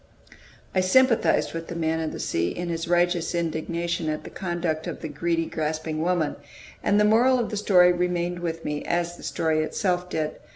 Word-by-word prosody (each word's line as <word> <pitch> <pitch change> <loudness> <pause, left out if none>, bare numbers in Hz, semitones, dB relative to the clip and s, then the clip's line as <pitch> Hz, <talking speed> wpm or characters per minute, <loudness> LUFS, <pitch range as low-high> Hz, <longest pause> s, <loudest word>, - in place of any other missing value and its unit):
I 185 - +2
sympathized 230 +6 +3
with 165 0 -5
the 170 - -6
"Man 160 -1 0
of 160 -1 -2
the - - -7
Sea" 85 +1 0
in 175 - -4
his 165 0 -3
righteous 175 0 +1
indignation 170 0 -2
at 155 0 -3
the - - -9
conduct 175 -3 -2
of - - -5
the 160 - -4
greedy, 165 +2 -1
grasping 155 0 -3
woman; 175 -2 0 0.5
and 205 - +3
the 210 - +5
moral 240 +5 +5
of 235 -3 -2
the - - -2
story 180 -3 +5
remained 175 0 -1
with 165 -1 -4
me, 150 0 -2
as 175 0 -1
the - - -14
story 160 -1 0
itself 180 +2 -1
did. 155 -3 -2
170 Hz, 195 wpm, -25 LUFS, 160-180 Hz, 0.5 s, the